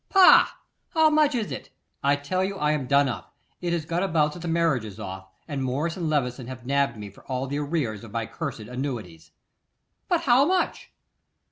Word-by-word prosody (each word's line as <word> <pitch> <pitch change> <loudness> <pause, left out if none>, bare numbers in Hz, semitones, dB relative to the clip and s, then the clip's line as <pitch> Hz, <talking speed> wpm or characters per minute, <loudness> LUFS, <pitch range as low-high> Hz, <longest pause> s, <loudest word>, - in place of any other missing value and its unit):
'Pah! 385 -2 +7 0.4
How 315 -1 +5
much 300 -2 +3
is 225 -4 -2
it?' - - -6 0.3
'I 140 +1 +4
tell 145 +6 -1
you 195 +1 -2
I 150 -4 +1
am 145 -4 -1
done 140 +1 +4
up. 120 -4 -6 0.3
It 175 -1 -1
has 170 -3 -1
got 170 +2 -1
about 160 -5 +2
that 175 - -9
the 175 - -6
marriage 165 -7 +2
is 105 -3 -9
off, 95 0 -7 0.2
and 135 -2 -3
Morris 145 +6 -1
and 170 -4 -2
Levison 125 -4 -1
have 125 -1 -8
nabbed 140 -3 +1
me 105 -1 -8
for - - -18
all 130 0 -2
the 140 +2 -3
arrears 140 -9 -2
of 115 - -9
my 115 0 -2
cursed 140 -3 -5
annuities.' 110 - -5 0.8
'But 350 -3 +2
how 255 0 +5
much? 365 +4 0
145 Hz, 205 wpm, -25 LUFS, 125-170 Hz, 0.8 s, Pah